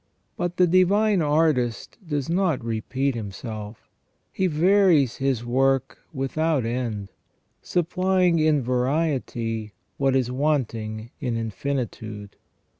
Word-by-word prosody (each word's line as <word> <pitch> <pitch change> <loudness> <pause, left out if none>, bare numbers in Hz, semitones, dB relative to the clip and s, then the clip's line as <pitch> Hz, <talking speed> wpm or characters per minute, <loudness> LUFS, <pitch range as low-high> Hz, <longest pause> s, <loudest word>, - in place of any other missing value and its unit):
But 175 0 -3
the 180 - +6
Divine 190 +3 +3
Artist 150 - +1
does 145 -4 -2
not 170 -7 0
repeat 130 +4 -1
Himself: 110 0 -7 0.4
He 190 - 0
varies 170 - +3
His 135 -4 -1
work 135 +1 +1
without 145 0 0
end, 115 -4 -3 0.5
supplying 180 0 +1
in 155 -3 +3
variety 125 -4 -1 0.2
what 135 -1 +2
is 125 -2 +1
wanting 120 -6 -1
in 120 -4 -2
infinitude. 110 -3 -4
135 Hz, 105 wpm, -24 LUFS, 115-165 Hz, 0.5 s, the